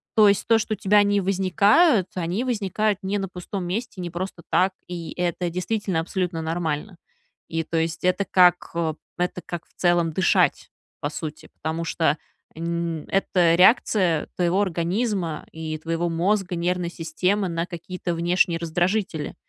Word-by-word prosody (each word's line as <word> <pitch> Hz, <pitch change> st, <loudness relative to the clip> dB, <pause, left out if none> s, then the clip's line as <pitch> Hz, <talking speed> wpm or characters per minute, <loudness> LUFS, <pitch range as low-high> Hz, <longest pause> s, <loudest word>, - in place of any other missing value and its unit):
то 215 Hz, -2 st, +7 dB
есть 200 Hz, +1 st, +1 dB
то, 225 Hz, -1 st, +5 dB
что 215 Hz, 0 st, -2 dB
у -, -, -20 dB
тебя 205 Hz, +2 st, +4 dB
они 205 Hz, 0 st, +3 dB
возникают, 200 Hz, -, +3 dB
они 180 Hz, +5 st, -2 dB
возникают 215 Hz, -4 st, 0 dB
не 195 Hz, +1 st, -1 dB
на 195 Hz, -1 st, -2 dB
пустом 180 Hz, +1 st, -6 dB
месте, 210 Hz, +4 st, -4 dB
не 175 Hz, -1 st, -4 dB
просто 175 Hz, 0 st, -5 dB
так, 185 Hz, +1 st, +3 dB, 0.2 s
и 175 Hz, -2 st, -6 dB
это 175 Hz, 0 st, 0 dB
действительно 180 Hz, +1 st, -1 dB
абсолютно 175 Hz, 0 st, -2 dB
нормально. 165 Hz, +3 st, -3 dB, 0.5 s
И, 165 Hz, 0 st, -2 dB
то 165 Hz, +1 st, -3 dB
есть, 165 Hz, 0 st, -1 dB
это 185 Hz, +2 st, +2 dB
как, 180 Hz, -1 st, +4 dB, 0.5 s
это 180 Hz, 0 st, -2 dB
как, 175 Hz, -2 st, -5 dB
э, -, -, -34 dB
в -, -, -17 dB
целом 175 Hz, -2 st, +3 dB
дышать, 185 Hz, +3 st, +2 dB, 0.3 s
по 145 Hz, -, -1 dB
сути, 155 Hz, 0 st, -7 dB
потому 160 Hz, +2 st, -3 dB
что 160 Hz, -2 st, +1 dB, 0.4 s
н 170 Hz, -1 st, -3 dB
это 180 Hz, -3 st, +3 dB
реакция 185 Hz, -4 st, +4 dB
твоего 180 Hz, +2 st, +2 dB
организма 185 Hz, -1 st, -1 dB
и 160 Hz, -1 st, -5 dB
твоего 165 Hz, +2 st, -2 dB
мозга, 180 Hz, +2 st, 0 dB
нервной 175 Hz, 0 st, -1 dB
системы 180 Hz, +4 st, -1 dB
на 165 Hz, 0 st, -2 dB
какие-то 175 Hz, 0 st, -5 dB
внешние 170 Hz, 0 st, +2 dB
раздражители. 175 Hz, -1 st, -1 dB
180 Hz, 155 wpm, -24 LUFS, 165-195 Hz, 0.5 s, то